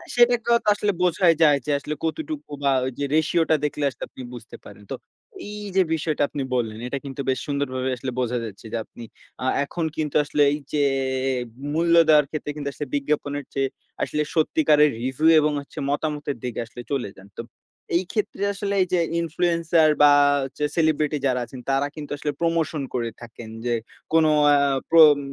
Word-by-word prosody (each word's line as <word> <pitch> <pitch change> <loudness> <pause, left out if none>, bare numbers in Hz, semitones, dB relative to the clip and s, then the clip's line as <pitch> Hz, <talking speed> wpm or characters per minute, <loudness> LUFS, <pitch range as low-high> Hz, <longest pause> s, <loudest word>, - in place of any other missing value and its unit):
সেটাই 240 0 +5
তো 235 - -2 0.2
আসলে 205 0 0
বোঝাই 180 -1 +4
যায়, 145 -2 +6
যে, 150 - -1
আসলে 150 +1 -5
কতটুকু 300 - -4
বা 140 - +3 0.3
যে, - - -1
রেশিওটা 160 +1 +2
দেখলে 150 0 -2
আসলে - - -10
আপনি - - -11
বুঝতে 120 -1 -10
পারেন। - - -13
তো - - -1 0.5
এই 210 0 -7
যে, 190 - +5
বিষয়টা 155 -2 -1
আপনি 145 - -4
বললেন 110 -3 -2
এটা 140 - -3
কিন্তু 140 0 -5
বেশ 130 -1 +1
সুন্দরভাবে 130 -3 -2
আসলে 130 +1 -4
বোঝা 125 0 0
যাচ্ছে 105 0 -10
যে, - - 0
আপনি 120 - -12 0.4
আ - - -2 0.2
এখন 165 +3 -3
কিন্তু 150 -2 -2
আসলে 145 0 -1
এই 145 - -1 0.2
যে, 150 - +2 0.9
মূল্য 170 +2 +2
দেওয়ার 150 -2 +6
ক্ষেত্রে 150 -1 -4
কিন্তু 145 -2 -4
আসলে 150 - -5
বিজ্ঞাপনের 145 0 -1
চেয়ে 135 -1 0 0.3
আসলে 150 - -1
সত্যিকারের 150 -1 +4
রিভিউ 130 +5 +1
এবং 150 0 +2 0.4
মতামতের 145 -1 -2
দিকে 125 -2 -4
আসলে 120 +2 -10
চলে 135 -7 -1
যান। 95 0 -14
তো - - -4 0.5
এই 175 - +2
ক্ষেত্রে 210 -2 -2
আসলে 200 0 -3
এই 185 - +2
যে, 180 - +4 0.2
ইনফ্লুয়েন্সার 170 -1 +2
বা 145 - +8 0.3
হচ্ছে 135 +2 -5
সেলিব্রিটি 155 -2 +1
যারা 125 -1 +1
আছেন 130 - -11
তারা 135 +1 +1
কিন্তু 150 -2 -8
আসলে 145 0 -2
প্রমোশন 165 -2 0
করে 120 -2 -1
থাকেন, 115 -1 -10 0.2
যে, 120 - +1 0.4
কোন 165 -1 +5 0.3
আ - - +6 0.3
প্রম 155 -3 +8
150 Hz, 180 wpm, -23 LUFS, 135-165 Hz, 0.9 s, বা